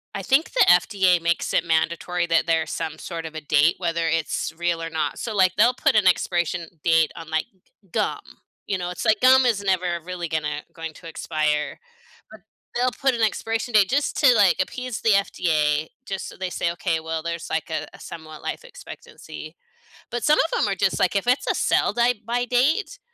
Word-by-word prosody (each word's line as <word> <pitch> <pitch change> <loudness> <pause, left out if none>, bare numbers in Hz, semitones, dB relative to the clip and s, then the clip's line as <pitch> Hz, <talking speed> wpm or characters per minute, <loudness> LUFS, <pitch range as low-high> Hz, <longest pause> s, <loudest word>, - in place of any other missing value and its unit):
I 195 - -4
think 270 - +2
the - - +4
FDA 180 -1 +4
makes 170 0 0
it - - +2
mandatory 170 +2 0
that 165 0 +2
there's 160 -1 0
some 160 0 -4
sort 165 0 -6
of 160 - -7
a 155 - -6
date, 150 +2 +3
whether 170 -2 -1
it's 160 -1 -1
real 170 -1 -1
or 165 - -4
not. 160 -2 -2
So, 225 - -4
like, 185 -2 +3
they'll 235 +4 +4
put 245 - +1
an 215 -3 +4
expiration 175 -1 +1 0.2
date 165 -2 +3
on, 165 -1 -9
like, 160 0 0 0.5
gum, - - -1 0.5
you 195 - -1
know, 175 -1 -4
it's 180 - -5
like 220 -1 +3
gum 260 0 +6
is 225 -5 +1
never 180 -3 0
really 175 0 -5
gonna 150 -1 -2
going 165 -1 -7
to 165 - -13
expire, 155 -2 -2 0.5
but 220 -1 -13 0.3
they'll 250 +1 +1
put 270 -1 +2
an 230 - -2
expiration 225 +2 -1
date 205 -3 +5
just 285 +2 0
to, 255 -3 +7
like, 200 -6 +4
appease 250 +5 -3
the 225 - +2
FDA 155 -6 +1 0.2
just 195 -1 -5
so - - -11
they 185 -1 -4
say, 170 - -1
"Okay, 170 -1 -1
well, 160 0 -4
there's, 170 0 -5
like 160 0 -2
a, 155 -1 -3
somewhat 155 -2 -10
life - - -5
expectancy." - - -11 0.6
But 240 -2 -3
some 300 +5 +4
of 325 - +1
em - - +2
are 195 - -1
just, 190 +1 0
like 185 - +1
if 200 +4 0
it's 250 +2 +2
a - - +1
sell - - +1
dy 240 +1 +3
by 240 +2 -1
date, 290 - +1
180 Hz, 205 wpm, -23 LUFS, 165-225 Hz, 0.6 s, to